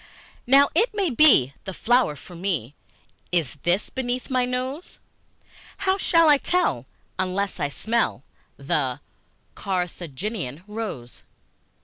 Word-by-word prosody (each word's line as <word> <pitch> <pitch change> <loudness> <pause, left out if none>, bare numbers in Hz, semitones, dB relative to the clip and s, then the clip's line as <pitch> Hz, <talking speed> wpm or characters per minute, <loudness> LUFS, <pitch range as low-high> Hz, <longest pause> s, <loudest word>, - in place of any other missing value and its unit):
Now 275 +3 +6
it 425 +6 +2
may 390 -6 0
be, 235 - +5
the 190 -2 -6
flower 240 -9 +2
for 160 +6 -13
me 170 - -2 0.6
Is 170 -7 0
this 175 +4 0
beneath 255 0 -3
my 255 -1 +2
nose; 255 +6 -4 0.8
How 380 +1 0
shall 330 -3 +4
I 295 -2 +6
tell, 330 - 0 0.3
unless 190 +1 -1
I 145 - 0
smell 230 +10 -1 0.3
The - - -1 0.5
Carthaginian 180 - -4
rose? 210 - -6
215 Hz, 115 wpm, -24 LUFS, 175-265 Hz, 0.8 s, Now